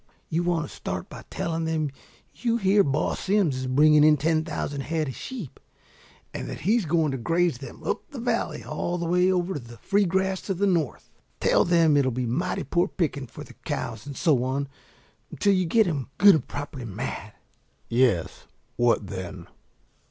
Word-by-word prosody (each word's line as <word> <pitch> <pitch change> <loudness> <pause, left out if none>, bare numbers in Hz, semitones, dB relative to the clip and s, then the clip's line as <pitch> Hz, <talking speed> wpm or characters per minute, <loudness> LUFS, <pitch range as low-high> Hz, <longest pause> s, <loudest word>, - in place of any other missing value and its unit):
You 165 +1 +1
want 170 -3 0
to - - -12
start - - -5
by - - -10
telling 165 -1 -2
them 155 -3 -1 0.4
you 235 -2 0
hear 200 -1 +4
Boss 140 0 0
Simms 190 -8 +2
is 130 0 -3
bringing 150 +3 +5
in 155 0 +6
ten 155 +2 +1
thousand 145 -3 -3
head 155 +2 -1
of 130 - -6
sheep, 230 - -7 0.7
and - - -5
that - - -6
he's 215 +4 +2
going 160 -2 +2
to 135 - -3
graze 165 +1 +1
them 135 - -10
up - - -3
the - - -8
valley - - -1
all 175 +1 -3
the 170 - -3
way 180 +2 +3
over 180 -2 0
the 120 -2 -12
free 200 - +2
grass 190 +1 0
to 195 - -3
the 200 +3 +1
north. 170 -8 -1 0.3
Tell - - +3
them 170 -3 +4
that 145 - +5
it'll 135 -2 +2
be 125 +1 -2
mighty 165 +11 -1
poor 175 +7 +1
picking 145 -8 -2
for - - -10
the - - -13
cows 110 +4 -4
and 140 - -7
so 145 -8 +3
on 135 +2 -1 0.6
until 200 - +2
you 185 -2 +1
get 220 +5 +4
'em 145 -7 -2
good 200 0 +8
and 160 - 0
properly 145 -3 -6
mad 105 - -5 0.3
" - - -41
"Yes, 115 -9 +1 0.3
what 120 -3 +3
then?" 95 -2 -6
155 Hz, 195 wpm, -26 LUFS, 135-180 Hz, 0.7 s, good